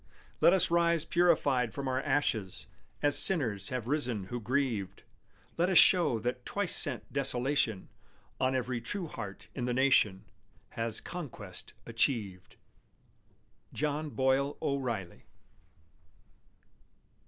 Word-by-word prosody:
Let -, -, +6 dB
us 185 Hz, -2 st, +4 dB
rise 170 Hz, -2 st, +2 dB
purified 145 Hz, -9 st, +2 dB
from 140 Hz, -1 st, -4 dB
our 130 Hz, 0 st, 0 dB
ashes 135 Hz, -10 st, -1 dB, 0.4 s
As 145 Hz, -1 st, +4 dB
sinners 115 Hz, -, +2 dB
have 125 Hz, -3 st, -4 dB
risen 125 Hz, -8 st, -1 dB
who 120 Hz, -, -2 dB
grieved; 120 Hz, -4 st, -2 dB, 0.5 s
Let 175 Hz, +2 st, +2 dB
us 185 Hz, -, +4 dB
show 175 Hz, -10 st, +5 dB
that 125 Hz, +2 st, -3 dB
twice 200 Hz, +4 st, -2 dB
sent 135 Hz, -7 st, +2 dB
desolation 130 Hz, -6 st, 0 dB, 0.5 s
On 130 Hz, 0 st, +1 dB
every 125 Hz, -1 st, -2 dB
true 185 Hz, -, -4 dB
heart 105 Hz, -10 st, -8 dB
in 125 Hz, -, -3 dB
the 125 Hz, -1 st, -1 dB
nation 110 Hz, -7 st, +3 dB, 0.4 s
Has 115 Hz, -1 st, -4 dB
conquest 115 Hz, -, -8 dB
achieved. 115 Hz, -6 st, -1 dB, 1.2 s
JOHN 150 Hz, +1 st, -2 dB
BOYLE 135 Hz, +1 st, +1 dB
O'REILLY. 120 Hz, -10 st, -3 dB
130 Hz, 115 wpm, -31 LUFS, 115-145 Hz, 1.2 s, Let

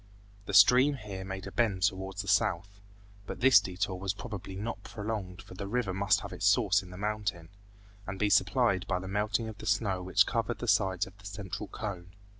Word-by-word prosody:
The 100 Hz, -, -2 dB
stream 125 Hz, +8 st, +7 dB
here 100 Hz, -6 st, -7 dB
made 95 Hz, 0 st, -6 dB
a -, -, -7 dB
bend 100 Hz, -6 st, 0 dB
towards 95 Hz, 0 st, -1 dB
the -, -, -12 dB
south, 100 Hz, -1 st, +1 dB, 0.5 s
but -, -, -6 dB
this 130 Hz, -4 st, +7 dB
detour 95 Hz, -1 st, -3 dB
was 95 Hz, 0 st, -2 dB
probably 100 Hz, -4 st, -7 dB
not 105 Hz, +4 st, -5 dB
prolonged 105 Hz, -4 st, -5 dB
for -, -, -13 dB
the 100 Hz, +2 st, -6 dB
river 110 Hz, -3 st, -1 dB
must 100 Hz, +1 st, +2 dB
have -, -, -7 dB
its -, -, 0 dB
source -, -, +4 dB
in 90 Hz, -, -13 dB
the 90 Hz, -, -10 dB
mountain, 105 Hz, -4 st, -3 dB, 0.6 s
and 95 Hz, +1 st, -5 dB
be 105 Hz, +1 st, +1 dB
supplied 100 Hz, -1 st, +2 dB
by 90 Hz, -, 0 dB
the 95 Hz, +1 st, -6 dB
melting 105 Hz, +3 st, -1 dB
of 110 Hz, -2 st, -8 dB
the 110 Hz, -, -7 dB
snow 100 Hz, -2 st, +1 dB
which 95 Hz, +2 st, +3 dB
covered 115 Hz, 0 st, -1 dB
the 120 Hz, -, -6 dB
sides 95 Hz, -2 st, +2 dB
of 95 Hz, -, -15 dB
the 100 Hz, -, -10 dB
central 100 Hz, 0 st, -6 dB
cone. 90 Hz, -3 st, -6 dB
100 Hz, 210 wpm, -30 LUFS, 95-105 Hz, 0.6 s, stream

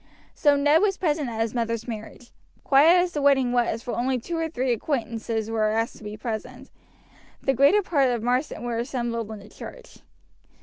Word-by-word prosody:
So 290 Hz, -2 st, +3 dB
Ned 290 Hz, +3 st, +4 dB
was 400 Hz, -2 st, +1 dB
present 300 Hz, -6 st, 0 dB
at 225 Hz, -1 st, -3 dB
his 225 Hz, -1 st, -1 dB
mother's 230 Hz, -1 st, -2 dB
marriage. 225 Hz, +1 st, -8 dB, 0.3 s
Quiet 325 Hz, +6 st, +6 dB
as 360 Hz, -, -3 dB
the 295 Hz, -, -3 dB
wedding 270 Hz, -3 st, +3 dB
was, 240 Hz, -1 st, 0 dB
for 245 Hz, -, -4 dB
only 255 Hz, +1 st, 0 dB
two 335 Hz, +9 st, -5 dB
or 325 Hz, 0 st, -1 dB
three 260 Hz, -4 st, -1 dB
acquaintances 225 Hz, -3 st, -3 dB
were 220 Hz, -1 st, +1 dB
asked 225 Hz, +2 st, -1 dB
to -, -, -15 dB
be 210 Hz, 0 st, -7 dB
present, 220 Hz, -1 st, -6 dB, 0.7 s
the 270 Hz, -, +1 dB
greater 280 Hz, -, +4 dB
part 280 Hz, -7 st, +2 dB
of 240 Hz, -3 st, -2 dB
Marsden 250 Hz, 0 st, -1 dB
were 235 Hz, -1 st, -2 dB
assembled 235 Hz, -3 st, -3 dB
in 220 Hz, -, -6 dB
the 200 Hz, 0 st, -13 dB
church. -, -, -12 dB
245 Hz, 190 wpm, -25 LUFS, 225-290 Hz, 0.7 s, Quiet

